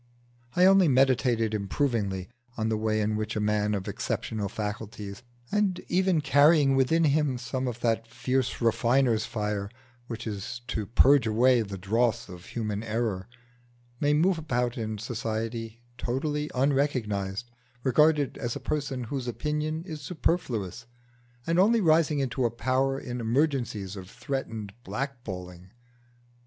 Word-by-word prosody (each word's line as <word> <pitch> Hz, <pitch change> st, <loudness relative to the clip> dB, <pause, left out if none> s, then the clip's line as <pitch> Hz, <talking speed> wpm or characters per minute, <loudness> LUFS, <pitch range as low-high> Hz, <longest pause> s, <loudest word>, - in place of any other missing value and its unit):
I 180 Hz, -, +6 dB
only 190 Hz, -2 st, +6 dB
meditated 125 Hz, -4 st, +3 dB
improvingly 100 Hz, -3 st, -1 dB, 0.3 s
on 110 Hz, 0 st, 0 dB
the 110 Hz, -, +1 dB
way 110 Hz, 0 st, 0 dB
in 105 Hz, +1 st, 0 dB
which 110 Hz, 0 st, -3 dB
a -, -, 0 dB
man 105 Hz, 0 st, +1 dB
of 95 Hz, -2 st, -4 dB
exceptional 105 Hz, -3 st, -3 dB
faculties, 105 Hz, -1 st, -5 dB, 0.3 s
and 205 Hz, -3 st, +1 dB
even 185 Hz, -3 st, +2 dB
carrying 145 Hz, 0 st, +5 dB
within 150 Hz, +6 st, +3 dB
him 150 Hz, -3 st, +2 dB
some 130 Hz, +2 st, -3 dB
of 120 Hz, -1 st, -4 dB
that 115 Hz, -1 st, +1 dB
fierce 125 Hz, +2 st, -1 dB
refiner's 115 Hz, 0 st, +2 dB
fire 105 Hz, -2 st, -2 dB, 0.4 s
which 115 Hz, -2 st, -6 dB
is 110 Hz, +2 st, -5 dB
to 105 Hz, -3 st, -2 dB
purge 130 Hz, +1 st, +5 dB
away 120 Hz, +3 st, +4 dB
the 100 Hz, -2 st, -5 dB
dross 110 Hz, +5 st, 0 dB
of 90 Hz, 0 st, -10 dB
human 105 Hz, -3 st, -3 dB
error, 110 Hz, -4 st, -2 dB, 0.7 s
may 145 Hz, 0 st, +3 dB
move 170 Hz, +3 st, +3 dB
about 125 Hz, -6 st, -1 dB
in 110 Hz, -2 st, -3 dB
society 115 Hz, 0 st, -4 dB, 0.2 s
totally 150 Hz, +4 st, -1 dB
unrecognised, 120 Hz, -6 st, 0 dB, 0.3 s
regarded 150 Hz, +1 st, +3 dB
as 120 Hz, -1 st, -2 dB
a -, -, -4 dB
person 140 Hz, -4 st, -2 dB
whose 125 Hz, +1 st, -4 dB
opinion 150 Hz, +5 st, -2 dB
is 155 Hz, -5 st, -7 dB
superfluous, 125 Hz, -, -2 dB, 0.6 s
and 165 Hz, +1 st, +2 dB
only 225 Hz, +5 st, +5 dB
rising 160 Hz, -4 st, +3 dB
into 135 Hz, -1 st, -1 dB
a 120 Hz, -, +3 dB
power 130 Hz, +3 st, 0 dB
in 125 Hz, -2 st, -5 dB
emergencies 120 Hz, -6 st, 0 dB
of 95 Hz, -2 st, -9 dB
threatened 115 Hz, -5 st, -4 dB
black 135 Hz, -1 st, -4 dB
balling. 90 Hz, -3 st, -8 dB
120 Hz, 140 wpm, -28 LUFS, 110-140 Hz, 0.7 s, I